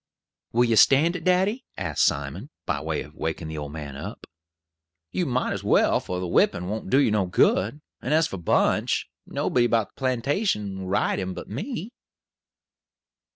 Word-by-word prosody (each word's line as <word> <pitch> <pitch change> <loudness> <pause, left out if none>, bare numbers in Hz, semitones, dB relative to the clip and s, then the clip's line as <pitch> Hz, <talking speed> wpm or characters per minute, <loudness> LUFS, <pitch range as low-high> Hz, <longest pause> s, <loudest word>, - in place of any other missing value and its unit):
"Will 120 +2 +3
you 115 -2 +2
stand 150 - +5
it, 175 - -5
daddy?" 190 +8 +2
asked 80 -6 0
Simon, - - -2 0.2
by - - -1
way - - -2
of 75 - -15
waking 80 0 -4
the 80 - -5
old 75 -1 -6
man 75 -3 -7
up. 70 - -7 0.9
"You 180 -3 -1
mought 130 0 0
as - - -5
well, - - +3
for 90 - -4
the 90 - -3
whippin' 85 +1 +2
won't 110 +3 -4
do 130 - +4
you 140 -6 +4
no 105 -3 +1
good; 110 +9 +2 0.2
and 130 - -3
as 160 +1 +4
for 95 - -5
Bunch, 85 - +1 0.2
nobody 120 -1 +1
about 115 -3 +1
the - - -26
plantation 130 - 0
won't 95 -1 -5
ride 100 - +1
him 95 -1 -3
but - - -8
me." 220 - -5
115 Hz, 180 wpm, -25 LUFS, 90-145 Hz, 0.9 s, stand